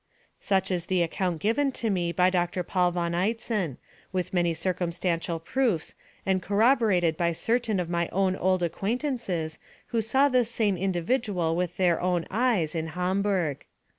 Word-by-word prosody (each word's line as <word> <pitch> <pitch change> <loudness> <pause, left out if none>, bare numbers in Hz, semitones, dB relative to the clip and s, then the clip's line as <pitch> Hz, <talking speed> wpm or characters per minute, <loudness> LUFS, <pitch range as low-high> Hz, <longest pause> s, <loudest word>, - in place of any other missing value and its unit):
"Such 190 -1 0
is 175 -2 -1
the 185 -2 +2
account 175 0 -2
given 270 +6 +2
to 225 -3 -1
me 175 -3 0
by 180 +1 +3
Doctor 180 0 0
Paul 180 +1 +1
von 170 -1 -1
Eitzen, 195 - -1 0.3
with 185 -1 -2
many 175 -2 +2
circumstantial 170 -1 -1
proofs, 210 -2 -1 0.3
and 190 -1 +1
corroborated 205 -6 +3
by 170 +1 +1
certain 225 +2 0
of 175 - -2
my 170 0 -1
own 190 0 +1
old 185 -1 +1
acquaintances 195 - -2 0.3
who 230 - +1
saw 265 +6 +3
this 250 -4 +2
same 215 -4 +1
individual 185 -1 0
with 180 0 -2
their 175 -3 +2
own 180 -2 0
eyes 215 -9 +1
in 160 -1 -2
Hamburg. 180 -2 -1
185 Hz, 155 wpm, -27 LUFS, 170-215 Hz, 0.3 s, by